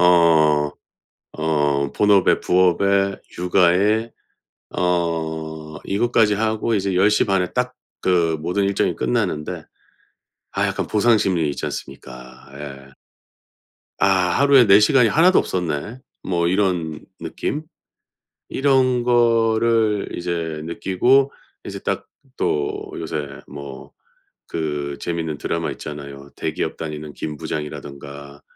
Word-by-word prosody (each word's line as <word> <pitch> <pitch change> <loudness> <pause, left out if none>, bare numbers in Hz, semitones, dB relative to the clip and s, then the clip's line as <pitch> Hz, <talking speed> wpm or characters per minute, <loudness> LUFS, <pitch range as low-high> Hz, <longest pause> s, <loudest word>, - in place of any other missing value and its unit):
어 80 -4 +4 0.7
어 75 -3 +1
본업에 100 -3 +4
부업에 100 +2 +2 0.2
육아에 95 +5 +2 0.7
어 80 -3 -2
이것까지 105 0 +2
하고 110 +2 0
이제 100 -2 0
10:30 95 0 +3
에 90 - -3
딱 125 0 -1 0.3
그 85 -3 +2
모든 90 +5 0
일정이 100 0 +1
끝나는데 75 +4 -2 0.9
아 - - 0
약간 - - -2
보상 110 +2 +3
심리 85 -7 +1
있지 70 - -4
않습니까. 65 +1 -9
예. 70 -1 -9 1.1
'아 - - +3 0.3
하루에 140 -4 +6
내 100 +1 +7
시간이 125 +1 +5
하나도 180 +7 +5
없었네.' 90 - -2 0.2
뭐 85 -2 0
이런 90 -5 0 0.2
느낌? 150 +2 -3 0.9
이런 130 -3 +2
거를 115 -3 +2
이제 85 -3 -3
느끼고 125 +11 +2 0.3
이제 - - -6
딱 - - -3 0.3
또 75 -1 -1
요새 75 -3 -4 0.2
뭐 70 -2 -10 0.6
그 75 -3 -3
재밌는 80 -3 -3
드라마 85 0 -2
있잖아요. 70 -1 -8
대기업 - - -3
다니는 75 -1 -6
김 75 -1 -5
부장이라든가. 70 -1 -7
85 Hz, 220 characters per minute, -21 LUFS, 75-105 Hz, 1.1 s, 내